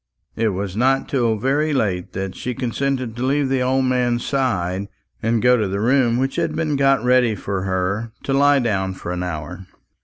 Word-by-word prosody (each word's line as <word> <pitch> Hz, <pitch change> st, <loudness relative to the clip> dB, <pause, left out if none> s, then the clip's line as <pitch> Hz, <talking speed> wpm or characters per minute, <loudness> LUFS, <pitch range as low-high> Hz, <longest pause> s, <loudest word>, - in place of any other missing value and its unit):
It 115 Hz, -, +1 dB
was 95 Hz, -1 st, -4 dB
not 130 Hz, +4 st, +2 dB
till 120 Hz, -5 st, +1 dB
very 145 Hz, +7 st, +1 dB
late 95 Hz, -9 st, -1 dB
that 95 Hz, 0 st, -4 dB
she 125 Hz, -1 st, -5 dB
consented 130 Hz, -1 st, -2 dB
to 120 Hz, -, -4 dB
leave 140 Hz, +1 st, +1 dB
the 135 Hz, -1 st, +1 dB
old 130 Hz, +1 st, +1 dB
man's 125 Hz, -2 st, 0 dB
side 100 Hz, -8 st, -1 dB, 0.3 s
and 115 Hz, 0 st, 0 dB
go 125 Hz, 0 st, +5 dB
to 105 Hz, -3 st, 0 dB
the 100 Hz, +1 st, -2 dB
room 120 Hz, +1 st, +2 dB
which 135 Hz, +1 st, -1 dB
had 165 Hz, -2 st, -1 dB
been 155 Hz, -2 st, 0 dB
got 135 Hz, -3 st, +3 dB
ready 125 Hz, -3 st, +3 dB
for 95 Hz, 0 st, -3 dB
her, 95 Hz, +4 st, -1 dB
to 135 Hz, -, -1 dB
lie 145 Hz, +1 st, +5 dB
down 95 Hz, -7 st, -1 dB
for 90 Hz, -, -6 dB
an 90 Hz, 0 st, -3 dB
hour. 90 Hz, +1 st, -5 dB
120 Hz, 195 wpm, -21 LUFS, 100-135 Hz, 0.3 s, go